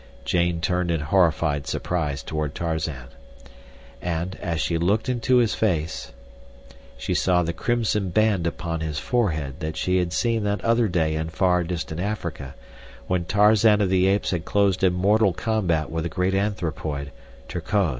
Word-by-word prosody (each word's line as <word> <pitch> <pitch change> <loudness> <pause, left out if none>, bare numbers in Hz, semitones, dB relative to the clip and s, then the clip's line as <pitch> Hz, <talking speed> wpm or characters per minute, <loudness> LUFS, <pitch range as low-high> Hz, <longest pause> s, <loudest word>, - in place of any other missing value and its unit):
Jane 85 -1 +1
turned 90 +1 0
in 85 -1 +1
horrified 80 -3 +1
surprise 75 -6 -2
toward 75 -2 -3
Tarzan. 80 -6 -3 0.9
And, 85 +1 -2
as 85 -2 -2
she 85 0 0
looked 100 +8 +1
into 125 +1 +2
his 120 -3 +3
face, 85 -7 -1 0.9
she - - -2
saw 90 -1 +2
the 85 0 -2
crimson 110 -4 0
band 105 -3 +2
upon 85 0 -3
his 80 -2 -3
forehead 80 - -1
that 80 -1 -4
she 90 0 +1
had 90 -1 -1
seen 115 +3 0
that 105 0 -1
other 115 0 +3
day 80 -4 +1
in 80 +1 -2
far 90 0 +2
distant 85 -1 -4
Africa, 85 -9 -4 0.5
when 90 +4 -1
Tarzan 105 +2 +4
of 100 -3 +2
the 95 0 +3
Apes 100 +1 +1
had 85 -3 -2
closed 100 -1 +1
in 90 -1 +4
mortal 100 +2 +3
combat 90 -9 0
with 80 0 -2
the 85 - -2
great 90 +3 0
anthropoid—Terkoz. 80 - -2
90 Hz, 155 wpm, -24 LUFS, 80-100 Hz, 0.9 s, Tarzan